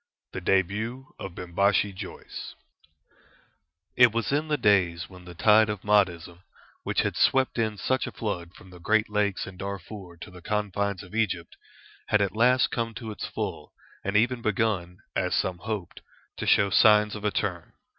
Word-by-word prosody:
THE 90 - -4
DEBUT 105 +8 -1
OF 95 -2 -7
BIMBASHI 100 +3 +1
JOYCE 95 0 -8 1.4
It 125 -2 +7
was 115 +2 -1
in 150 +3 0
the 150 -1 +1
days 95 -6 +2
when 90 -1 -14
the 90 -1 -10
tide 110 +4 +5
of 105 -2 -3
Mahdism, 90 -5 +1 0.4
which - - 0
had - - -2
swept 130 -2 +2
in 110 -2 0
such 130 +5 0
a - - -5
flood 90 -5 -4
from 95 -4 -15
the 90 - -13
great 110 +5 +1
Lakes 105 -2 0
and 95 -1 -11
Darfur 100 -2 -7
to - - -9
the 90 -1 -12
confines 100 -1 -2
of 90 - -14
Egypt, 95 -7 -1 0.5
had 105 - +3
at 100 0 0
last 125 +3 +4
come 115 -1 -2
to 115 -3 -6
its 105 - -5
full, - - -5 0.3
and 100 +2 +1
even 120 +2 +2
begun, 100 -5 -1 0.2
as - - 0
some 90 -2 -1
hoped, 105 -3 -5 0.4
to - - -4
show 100 -1 +4
signs 105 0 +5
of 105 - -7
a 105 - +2
turn. 90 -5 -3
100 Hz, 175 wpm, -26 LUFS, 90-110 Hz, 1.4 s, It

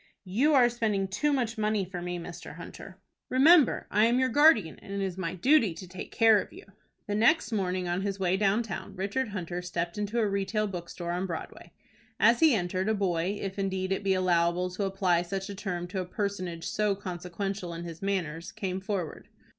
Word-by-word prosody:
"You 255 +12 +2
are 250 -3 +6
spending 220 -5 0
too 295 +10 0
much 240 -5 -1
money 210 -2 +1
for 180 -1 -6
me, 175 0 -3
Mr 170 0 -8
Hunter." - - -10 0.3
"Remember 295 +2 +5
I 210 +2 +4
am 240 +1 +2
your 260 0 +2
guardian, 270 - +4
and - - -12
it 200 - -2
is 185 -2 -4
my 185 -1 -3
duty 230 - +3
to 185 +2 -9
take 180 +1 -8
care 220 -3 +5
of - - -10
you." - - -13 0.4
The 205 - -3
next 235 +8 +3
morning 185 -4 -1
on 175 +2 -1
his 195 0 -3
way 185 -1 +2
down 205 +3 +2
town, 205 -2 -7
Richard 200 +7 -1
Hunter 180 -4 -4
stepped 175 +1 -3
into 210 +3 -2
a 225 -2 +3
retail 200 +2 0
bookstore 175 -2 -5
on 180 +2 -2
Broadway. 165 -3 -7 0.5
As 235 +1 +5
he 315 -6 +6
entered, 185 +1 -1
a 220 - +2
boy, 190 0 0
if 195 0 -5
indeed 190 -1 -1
it 195 - -1
be 195 -1 +2
allowable 180 0 +1
to 195 +3 -2
apply 190 -3 +1
such 195 +3 -4
a - - -4
term 180 -3 -4
to 190 0 -2
a - - -4
personage 185 -4 -3
so 210 -2 +1
consequential 180 0 -5
in 170 0 -6
his 165 -1 -8
manners, 175 -5 -2
came 190 -3 -4
forward. 190 -5 -4
195 Hz, 205 wpm, -28 LUFS, 180-215 Hz, 0.5 s, are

